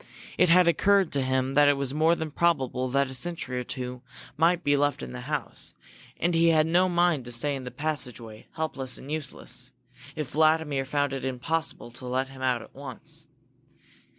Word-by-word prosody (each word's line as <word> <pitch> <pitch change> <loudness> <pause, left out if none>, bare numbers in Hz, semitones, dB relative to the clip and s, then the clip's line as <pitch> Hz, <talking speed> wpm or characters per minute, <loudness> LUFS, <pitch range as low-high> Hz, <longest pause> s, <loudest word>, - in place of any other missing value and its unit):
It - - +4
had 180 +1 +6
occurred 195 +1 +3
to 140 - +1
him 130 0 0
that 145 +1 +6
it 145 -1 +4
was 140 -1 -2
more 160 +3 +3
than 160 -2 -4
probable 135 -6 +1
that 140 +2 +2
a - - -5
sentry 130 -3 -3
or - - -3
two 125 0 -5 0.3
might 170 +3 +3
be 145 -2 +3
left 145 - +1
in 65 - -6
the 60 0 -6
house, - - -4 0.4
and 175 +1 +1
he 165 0 +4
had 155 -2 +5
no 180 +3 +3
mind 175 -5 +2
to 120 - -6
stay 140 +5 0
in 130 -2 -6
the - - -4
passageway, 125 -8 -4
helpless 135 -5 -3
and 140 - -9
useless, 130 -4 -5 0.4
if 150 -4 -4
Vladimir 155 -3 +2
found 145 0 0
it 135 - -4
impossible 130 0 -2
to 125 +1 -8
let 130 +2 -1
him 135 -1 -12
out 125 -2 +1
at - - -16
once. 135 -3 -9
140 Hz, 195 wpm, -27 LUFS, 130-160 Hz, 0.4 s, had